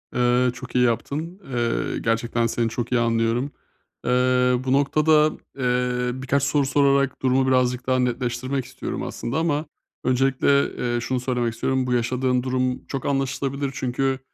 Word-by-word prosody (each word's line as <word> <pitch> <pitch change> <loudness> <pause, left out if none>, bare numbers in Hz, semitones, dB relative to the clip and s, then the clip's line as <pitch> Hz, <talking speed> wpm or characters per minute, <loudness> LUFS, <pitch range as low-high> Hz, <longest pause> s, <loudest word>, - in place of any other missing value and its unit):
Eee, 125 +1 +3
çok 125 -1 -10
iyi 125 - +4
yaptın. 150 - -2
Eee, 120 -1 -1
gerçekten 115 +1 0
seni 115 0 0
çok 120 +1 -4
iyi 125 - +3
anlıyorum. 115 +4 +1 0.5
Eee, 125 - +1 0.5
bu 130 0 +1
noktada, 150 +2 +4 0.3
eee, 125 0 0
birkaç 140 +1 0
soru 140 0 +2
sorarak, 140 -1 +2
durumu 130 0 +2
birazcık 125 -1 +1
daha 130 0 +2
netleştirmek 125 +1 -1
istiyorum 130 - -5
aslında 120 +6 -4
ama 160 -2 0 0.4
öncelikle, 135 +2 +3
eee, 120 -1 -1
şunu 130 +1 -1
söylemek 120 -2 -1
istiyorum. 130 +1 -1
Bu 125 - 0
yaşadığın 125 +1 +1
durum 130 -1 -1
çok 135 -2 -4
anlaşılabilir. 135 0 -1
Çünkü, 130 0 -1
130 Hz, 145 wpm, -23 LUFS, 125-135 Hz, 0.5 s, iyi